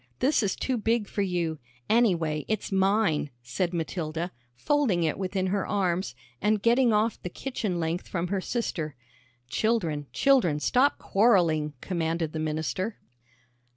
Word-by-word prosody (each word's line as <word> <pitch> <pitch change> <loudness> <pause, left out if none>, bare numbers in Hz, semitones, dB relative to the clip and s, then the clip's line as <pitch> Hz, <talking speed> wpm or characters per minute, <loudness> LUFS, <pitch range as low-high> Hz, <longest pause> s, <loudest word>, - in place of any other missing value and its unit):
This 280 +1 +2
is 200 -3 0
too 260 -2 -1
big 225 -1 +1
for 200 - -2
you. 175 -5 -1 0.3
Anyway, 170 -10 +2
it's 215 -2 -2
mine," 195 -5 +2
said 150 +9 -1
Matilda, 165 0 -3 0.2
folding 240 - +1
it 160 - +1
within 190 0 -2
her 195 +1 -1
arms, 190 -2 0 0.3
and 210 0 +2
getting 235 +3 +4
off 215 +1 +1
the 180 - -4
kitchen 210 -5 -3
length 165 +2 -2
from 175 -1 -2
her 195 -1 0
sister. 170 - -3 0.5
"Children, 160 - 0
children, 250 - +3
stop 255 - +3
quarrelling," 175 -8 +3
commanded 165 -3 -2
the 160 - -3
minister. 155 - -2
185 Hz, 140 wpm, -27 LUFS, 160-220 Hz, 0.5 s, getting